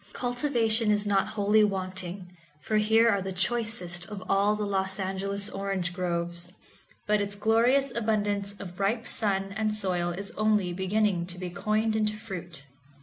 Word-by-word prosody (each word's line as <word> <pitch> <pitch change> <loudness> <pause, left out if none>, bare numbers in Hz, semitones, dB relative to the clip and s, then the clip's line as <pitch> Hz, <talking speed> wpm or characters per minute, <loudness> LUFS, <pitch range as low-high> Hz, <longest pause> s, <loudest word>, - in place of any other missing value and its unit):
Cultivation 245 -3 +1
is 210 0 +3
not 200 -1 +2
wholly 210 0 +3
wanting, 185 -2 -3 0.2
for 215 +7 -1
here 220 +2 +4
are 200 -4 +3
the 190 0 -4
choices 190 -2 0
of 200 -1 -7
all 200 +2 +3
the 210 0 -2
Los 190 0 -1
Angeles 195 +1 -1
orange 195 -3 -3
groves, 175 -1 -2 0.5
but 210 0 +2
its 200 0 -2
glorious 240 +6 +3
abundance 205 -3 0
of 190 -2 -10
ripe 220 +4 0
sun 195 -4 +1
and 215 0 0
soil 180 -4 -1
is 195 +4 -5
only 210 -4 +1
beginning 190 -1 0
to 180 0 -7
be 180 -1 -5
coined 215 +3 0
into 215 -1 0
fruit. 180 -9 -8
200 Hz, 155 wpm, -28 LUFS, 185-215 Hz, 0.5 s, here